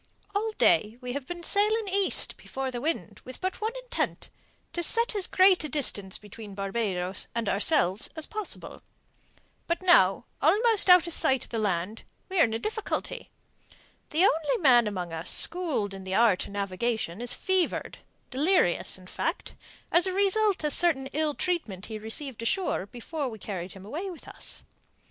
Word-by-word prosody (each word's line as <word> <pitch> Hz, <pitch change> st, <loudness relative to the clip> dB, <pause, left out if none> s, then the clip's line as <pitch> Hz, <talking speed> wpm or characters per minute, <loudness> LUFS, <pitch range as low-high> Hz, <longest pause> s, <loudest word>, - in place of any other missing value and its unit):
All 430 Hz, +2 st, -1 dB
day 210 Hz, -, +3 dB
we 250 Hz, -1 st, -5 dB
have 275 Hz, -1 st, -5 dB
been 345 Hz, -1 st, -6 dB
sailing 425 Hz, +3 st, +2 dB
east 390 Hz, 0 st, +1 dB
before 265 Hz, -1 st, -5 dB
the 240 Hz, -1 st, -5 dB
wind 320 Hz, +4 st, -3 dB
with 255 Hz, -, -9 dB
but 375 Hz, +2 st, -3 dB
one 440 Hz, +2 st, -1 dB
intent -, -, -3 dB, 0.4 s
to 345 Hz, -, -1 dB
set 465 Hz, +6 st, +2 dB
as 395 Hz, -3 st, -1 dB
great 370 Hz, -2 st, +5 dB
a 305 Hz, -, -4 dB
distance 205 Hz, -9 st, -1 dB
between 210 Hz, 0 st, -11 dB
Barbados 195 Hz, -2 st, -2 dB
and 230 Hz, -2 st, -1 dB
ourselves 200 Hz, -, +1 dB
as 315 Hz, -1 st, -2 dB
possible. 430 Hz, -3 st, -7 dB, 0.9 s
But 340 Hz, +2 st, -1 dB
now, 215 Hz, -, +5 dB, 0.2 s
almost 415 Hz, +6 st, +5 dB
out 360 Hz, -2 st, +8 dB
of 340 Hz, -, +1 dB
sight 265 Hz, -5 st, +2 dB
of -, -, -20 dB
land, 205 Hz, -1 st, -1 dB, 0.3 s
we 375 Hz, -1 st, -1 dB
are -, -, +7 dB
in 225 Hz, -, -4 dB
a -, -, +1 dB
difficulty. 440 Hz, -, -4 dB, 0.8 s
The 325 Hz, +3 st, +2 dB
only 325 Hz, +7 st, +2 dB
man 250 Hz, -, +5 dB
among 180 Hz, -5 st, -4 dB
us 165 Hz, +2 st, -5 dB
schooled 310 Hz, -, +1 dB
in 195 Hz, 0 st, -8 dB
the 190 Hz, 0 st, -3 dB
art 220 Hz, -5 st, +3 dB
of -, -, -11 dB
navigation 200 Hz, 0 st, -2 dB
is 245 Hz, 0 st, 0 dB
fevered, 375 Hz, -2 st, 0 dB, 0.3 s
delirious, 280 Hz, -, +1 dB
in 185 Hz, -, -15 dB
fact, -, -, -3 dB, 0.4 s
as 350 Hz, +2 st, +4 dB
a 375 Hz, -, -1 dB
result 400 Hz, -1 st, +2 dB
of 300 Hz, -, +1 dB
certain 280 Hz, -7 st, +2 dB
ill 305 Hz, -1 st, 0 dB
treatment 230 Hz, -, -2 dB
he 220 Hz, -1 st, -6 dB
received 230 Hz, +3 st, -5 dB
ashore 285 Hz, -, -1 dB
before 265 Hz, +5 st, -5 dB
we 220 Hz, -, -8 dB
carried 185 Hz, -3 st, -6 dB
him 195 Hz, 0 st, -12 dB
away 325 Hz, -, -5 dB
with 350 Hz, -, -10 dB
us. -, -, -6 dB
270 Hz, 170 wpm, -27 LUFS, -, 0.9 s, out